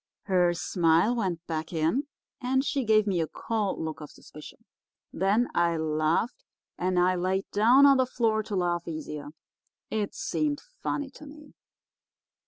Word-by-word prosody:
Her 180 -3 +2
smile 170 +7 +2
went 180 -7 -2
back 160 -1 -4
in 170 - 0 0.3
and 265 +2 +1
she 275 -3 -1
gave 215 -1 +4
me 185 -5 0
a 160 - -1
cold 215 0 -2
look 160 -1 -5
of 150 - -8
suspicion. 150 - -14 0.5
Then 205 +7 +2
I 170 -1 +2
laughed, 155 +8 0 0.3
and 185 +1 -1 0.3
laid 190 +2 0
down 240 +7 +6
on 275 -1 +6
the 260 -1 +2
floor 225 -3 +1
to 210 -1 -5
laugh 175 -2 -1
easier. 150 -2 -6 0.6
It 210 -2 -2
seemed 295 -1 -1
funny 295 - -5
to 300 +2 -13
me. 300 +1 -14
195 Hz, 150 wpm, -27 LUFS, 165-245 Hz, 0.6 s, down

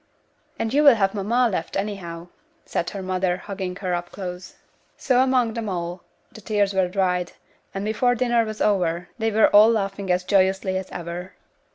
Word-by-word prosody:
"And 225 +1 -2
you 290 - +4
will 280 -4 +8
have 195 -3 +1
mamma 230 +5 +1
left, 185 -6 -3
anyhow," 180 -4 -5 0.4
said 170 - -2
her 195 -2 -6
mother, 185 -1 0
hugging 190 -1 -5
her 185 -1 -3
up 175 0 -3
close. 180 -2 -7 0.4
So 255 -2 +2
among 255 -3 +2
them 225 -2 -4
all, 175 -1 -4 0.3
the 220 - -12
tears 205 -1 0
were 190 -1 +2
dried; 180 -1 -1 0.4
and 195 +1 -4
before 245 +3 +1
dinner 240 -1 +2
was 215 -1 -6
over, 180 -4 +1
they 225 0 +1
were 220 0 +4
all 210 +2 +8
laughing 195 -3 -1
as 180 0 +1
joyously 190 0 +2
as 190 0 -3
ever. 175 +2 -7
195 Hz, 180 wpm, -23 LUFS, 180-220 Hz, 0.4 s, will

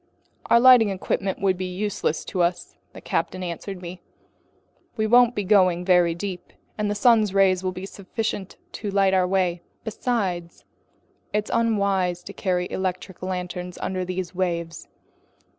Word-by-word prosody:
"Our 235 - +6
lighting 250 -3 +7
equipment 190 0 -2
would 190 -2 +1
be 185 -1 -3
useless 205 -6 -2
to 185 - -2
us," 175 +1 -1 0.2
the - - -12
captain 185 0 -2
answered 180 +2 -6
me. 175 +1 -8 1.0
"We 215 - +1
won't 245 +2 +5
be 205 - -1
going 185 -3 +3
very 175 -2 +4
deep, 185 0 -6 0.2
and 210 -1 -1
the 205 - -1
sun's 215 -2 +3
rays 190 -1 +4
will 185 - -1
be 185 +1 -7
sufficient 200 0 -5
to 210 - -5
light 195 -1 +2
our 185 -1 +3
way. 180 -2 0 0.2
Besides, 200 -7 -3 0.7
it's 210 0 -1
unwise 200 -6 +1
to 200 - -9
carry 180 -3 -1
electric 185 -1 -4
lanterns 180 -1 -4
under 185 -1 -2
these 185 0 -4
waves. 170 -3 -3
185 Hz, 150 wpm, -24 LUFS, 180-205 Hz, 1.0 s, lighting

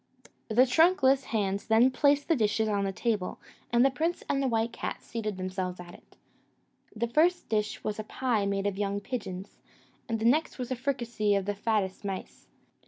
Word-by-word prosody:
The 240 +4 +5
trunkless 275 -2 +4
hands 200 -3 -1
then 230 +3 +5
placed 285 +2 +2
the 330 - +3
dishes 220 -2 +1
on 200 -2 0
the 195 - -1
table, 205 -2 -2 0.3
and 240 +2 +5
the 270 - +4
prince 325 +6 -1
and 275 -1 +1
white 230 0 0
cat - - -5
seated 215 -4 -4
themselves 185 -1 -4
at 175 0 -10
it. - - -18 0.8
The 230 +2 0
first 325 +9 +2
dish 210 -1 -1
was 215 0 -3
a - - -2
pie 225 -3 -1
made 200 0 -1
of 200 -1 -1
young 200 0 -1
pigeons, 205 -5 -6 0.5
and 225 - 0
the 220 - -3
next 300 +7 +2
was 250 -1 -5
a - - +1
fricassee 235 -5 0
of 195 -1 0
the 205 - -1
fattest 205 -2 -1
mice. 195 -2 -6
220 Hz, 185 wpm, -29 LUFS, 200-255 Hz, 0.8 s, The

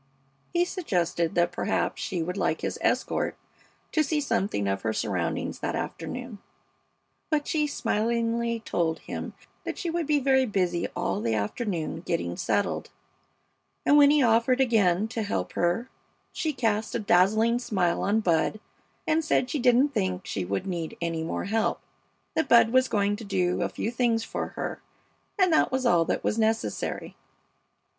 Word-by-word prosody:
He 345 0 +2
suggested 180 - -1
that 175 0 +3
perhaps - - -1
she 180 -5 -2
would 180 +2 -4
like - - 0
his - - -3
escort - - 0 0.5
to 310 - +3
see 305 +1 0
something 195 - 0
of 95 0 -1
her 110 -1 -1
surroundings 95 -7 -2
that - - -2
afternoon; 230 +6 -5 0.9
but 300 -2 0
she 300 -2 +1
smilingly 235 -2 0
told 165 -6 -1
him - - -6 0.3
that - - -4
she 340 - -3
would 335 -2 -2
be 300 - +3
very 265 -1 +3
busy 180 -4 0
all 95 +1 -1
the 115 0 0
afternoon 160 - -2
getting 125 - -2
settled, 205 - -1 1.0
and 290 - +5
when 290 -1 +8
he 295 -1 +4
offered 235 +2 +3
again 215 -6 +3
to 225 0 -3
help 95 - -2
her 175 +8 0 0.5
she 315 - -1
cast 220 -5 -1
a - - +1
dazzling 215 +4 +3
smile 185 -8 0
on 210 +3 +2
Bud 170 +2 +1 0.5
and 320 -1 +2
said 255 -4 +1
she 300 - -1
didn't 250 +3 +4
think 185 -7 -2
she 95 - -3
would 95 +2 -2
need 170 -4 -4
any 165 -1 -2
more 165 - -3
help, 220 +3 0 0.5
that 320 - 0
Bud 235 -1 +6
was 255 +1 +4
going 205 -2 +1
to 225 - -8
do 185 -3 0
a - - 0
few 225 - -3
things 235 -2 +1
for - - -4
her, - - -4 0.6
and 370 -4 +4
that 310 - +3
was 260 0 -1
all 170 -8 +4
that - - -1
was 225 - 0
necessary. 220 0 -1
220 Hz, 165 wpm, -27 LUFS, 175-255 Hz, 1.0 s, when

